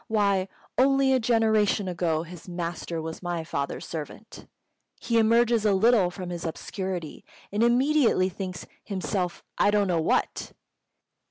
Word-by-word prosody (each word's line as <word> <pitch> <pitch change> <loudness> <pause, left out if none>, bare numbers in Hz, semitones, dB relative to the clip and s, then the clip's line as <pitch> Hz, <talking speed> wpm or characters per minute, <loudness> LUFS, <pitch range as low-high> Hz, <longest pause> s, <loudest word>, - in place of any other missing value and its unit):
Why, 200 -3 +1 0.3
only 270 0 +4
a 260 - +3
generation 220 -3 +2
ago 165 -3 -1
his 175 +1 -11
master 170 -1 -4
was 160 0 -6
my 175 -2 -3
father's 140 -3 -4
servant! 160 +7 -8 0.5
He 230 -1 +1
emerges 230 0 +3
a 210 -2 +3
little 210 -2 +4
from 180 0 -7
his 170 -1 -5
obscurity, 180 0 -5 0.3
and 205 +2 -1
immediately 245 -4 +3
thinks 185 -1 -6 0.2
himself 190 -2 -3 0.2
I - - +5
don't 205 -1 +3
know 170 -3 +1
what!" - - -1
190 Hz, 140 wpm, -26 LUFS, 175-225 Hz, 0.5 s, I